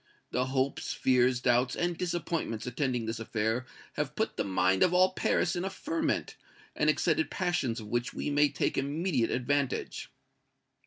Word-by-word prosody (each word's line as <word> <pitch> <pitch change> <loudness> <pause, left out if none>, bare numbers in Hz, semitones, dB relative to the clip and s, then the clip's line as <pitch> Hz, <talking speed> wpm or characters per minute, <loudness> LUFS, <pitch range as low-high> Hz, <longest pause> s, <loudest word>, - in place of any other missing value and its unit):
The 125 +1 0
hopes, 130 +1 -1
fears, 125 -1 +2
doubts 125 0 +2
and 175 0 0
disappointments 165 -9 -2
attending 125 -1 -1
this 115 +1 -3
affair 115 +2 -1 0.3
have - - -3
put - - -1
the - - 0
mind 95 -1 +2
of 180 - +4
all 185 +1 +5
Paris 180 -1 +1
in 175 - -2
a 190 - -1
ferment, 315 - -2 0.4
and - - +2
excited 330 - +2
passions 175 - -1
of 110 - -8
which 120 +3 -1
we - - -3
may 145 0 +4
take 140 - 0
immediate 140 -3 0
advantage." 135 +1 -1
130 Hz, 160 wpm, -30 LUFS, 120-175 Hz, 0.4 s, all